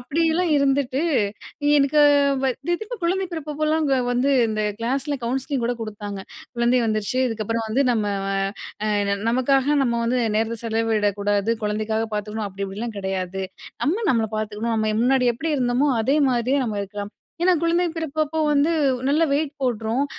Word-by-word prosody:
அப்படியெல்லாம் 325 +6 +1
இருந்துட்டு, 275 0 +1 0.8
எனக்கு 285 +2 +4 0.4
வ - - +3 0.2
"இது 345 +2 +1
எதுக்கு?" 435 +5 -7
குழந்தை 375 +3 +1
பிறப்பப்பல்லாங்க 305 -1 0 0.2
வந்து, 260 +3 +2 0.2
இந்த 215 -1 -1 0.2
கிளாஸ்ல 275 +4 -1
கவுன்சிலிங் 265 +1 -1
கூட 245 0 -1
குடுத்தாங்க. 205 -2 -6 0.4
"குழந்தை 240 +1 +3
வந்துருச்சு, 215 +3 -1
இதுக்கப்பறம் 225 0 -2
வந்து 265 +5 +2
நம்ம 215 -3 0 0.2
வ - - -2 0.6
அ - - 0 0.2
என்ன 200 0 0
நமக்காக 270 +3 +2
நம்ம 240 -2 0
வந்து 250 +2 +1 0.2
நேரத்த 225 +1 0
செலவிடக்கூடாது, 225 -2 +1 0.5
குழந்தைக்காக 215 +1 -1
பார்த்துக்கணும், 210 +1 -3
அப்படி 195 +1 -7
இப்படிலாம் 215 +4 -5
கெடையாது. 190 -1 -3 0.4
நம்ம 375 +10 0
நம்மள 230 -3 +2
பார்த்துக்கணும். 215 +2 -2
நம்ம 215 0 +1
முன்னாடி 255 +1 +3
எப்படி 275 +8 -4
இருந்தமோ, 250 +2 +1
அதே 260 +6 +2
மாதிரியே 250 +2 +1
நம்ம 220 -3 -3
இருக்கலாம். 200 +1 -6 0.3
ஏன்னா, 365 +1 +5
குழந்தை 340 +1 +2
பிறப்பப்போ 315 0 -2
வந்து 290 +2 +3 0.4
நல்ல 300 +4 +3
வெயிட் 290 0 0
போட்டுரும். 235 +1 0
245 Hz, 150 wpm, -23 LUFS, 215-285 Hz, 0.8 s, ஏன்னா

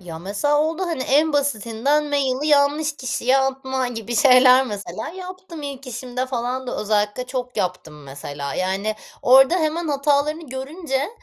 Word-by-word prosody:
Ya, 170 -3 -8
mesela, 205 - 0
oldu, 320 +4 -1
hani, 330 -7 -2
en 295 +4 +2
basitinden 280 +1 0
maili 280 0 0
yanlış 295 +1 +2
kişiye 255 +1 +1
atma 265 -1 -1
gibi 230 0 -4
şeyler, 255 +2 +6
mesela 205 -3 -6
yaptım. 365 -2 -9
İlk 275 -1 -7
işimde 250 +1 -4
falan 255 0 -3
da - - -4
özellikle 210 +3 0
çok 250 -1 -5
yaptım, 180 -5 -4
mesela, 140 0 -6
yani. 195 +4 -1 0.3
Orada 265 +5 +6
hemen 315 0 -1
hatalarını 290 +2 0
görünce; 270 +2 -3
265 Hz, 145 wpm, -22 LUFS, 225-290 Hz, 0.3 s, şeyler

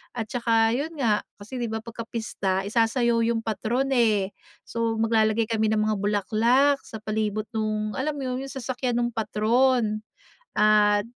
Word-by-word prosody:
at 225 - -2
taka, 225 -2 +2
'yon 285 +6 -1
nga, 225 -6 +2 0.2
kasi 215 +5 -8
'di 235 - -1
ba, 220 0 -4
pagkapista 220 -4 -3
isasayaw 230 +2 +2
yung 225 -1 -1
patron 240 +5 -1
eh. 210 -5 +2 0.3
So, 230 -1 -1
maglalagay 220 0 +2
kami 220 -1 +2
ng 215 -1 +2
mga 215 0 +1
bulaklak, 230 +8 +2
sa 220 - -9
palibot 215 0 -1
no'ng, 215 -1 -1
alam 290 +5 -2
mo 275 - -4
'yon, 255 0 -2
yung - - -9
sasakyan 255 -2 -3
no'ng 240 0 0
patron 220 +1 +1 0.6
at 210 -1 +4
225 Hz, 155 wpm, -25 LUFS, 215-240 Hz, 0.6 s, at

